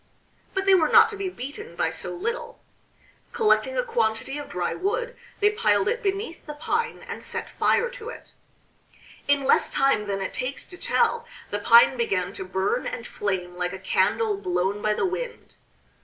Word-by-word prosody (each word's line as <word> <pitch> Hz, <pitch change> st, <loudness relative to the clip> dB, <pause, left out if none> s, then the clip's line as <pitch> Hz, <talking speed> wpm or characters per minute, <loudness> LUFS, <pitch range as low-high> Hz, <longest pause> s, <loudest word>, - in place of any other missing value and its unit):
But 385 Hz, 0 st, 0 dB
they 390 Hz, -, +6 dB
were 330 Hz, -4 st, +4 dB
not -, -, +7 dB
to 440 Hz, -, -5 dB
be 395 Hz, -1 st, -3 dB
beaten 330 Hz, -, -8 dB
by -, -, 0 dB
so -, -, -5 dB
little; 455 Hz, +7 st, -4 dB, 0.7 s
collecting -, -, +2 dB
a -, -, +2 dB
quantity 280 Hz, -, -1 dB
of 290 Hz, -, -8 dB
dry 175 Hz, -1 st, -2 dB
wood 445 Hz, +6 st, -2 dB, 0.3 s
they 415 Hz, +1 st, +5 dB
piled 425 Hz, -2 st, +2 dB
it 470 Hz, +3 st, 0 dB
beneath 390 Hz, -4 st, -3 dB
the 300 Hz, -, -6 dB
pine 460 Hz, +10 st, -2 dB
and -, -, -6 dB
set -, -, -3 dB
fire 470 Hz, -, +2 dB
to 485 Hz, -2 st, -8 dB
it. -, -, -11 dB, 1.0 s
In 285 Hz, -1 st, +3 dB
less -, -, +3 dB
time 270 Hz, -6 st, +2 dB
than 195 Hz, -1 st, -1 dB
it 190 Hz, -, -4 dB
takes 255 Hz, +2 st, -4 dB
to 365 Hz, -, -10 dB
tell 470 Hz, 0 st, +1 dB, 0.2 s
the -, -, -1 dB
pine 475 Hz, +1 st, +6 dB
began 460 Hz, -4 st, 0 dB
to 380 Hz, -, -5 dB
burn 200 Hz, -, -1 dB
and 235 Hz, -, -5 dB
flame 185 Hz, -5 st, -3 dB
like 180 Hz, +1 st, -2 dB
a -, -, -4 dB
candle 420 Hz, -, +1 dB
blown 205 Hz, -, -1 dB
by 210 Hz, 0 st, +1 dB
the -, -, 0 dB
wind. 430 Hz, +7 st, -5 dB
375 Hz, 185 wpm, -25 LUFS, -, 1.0 s, not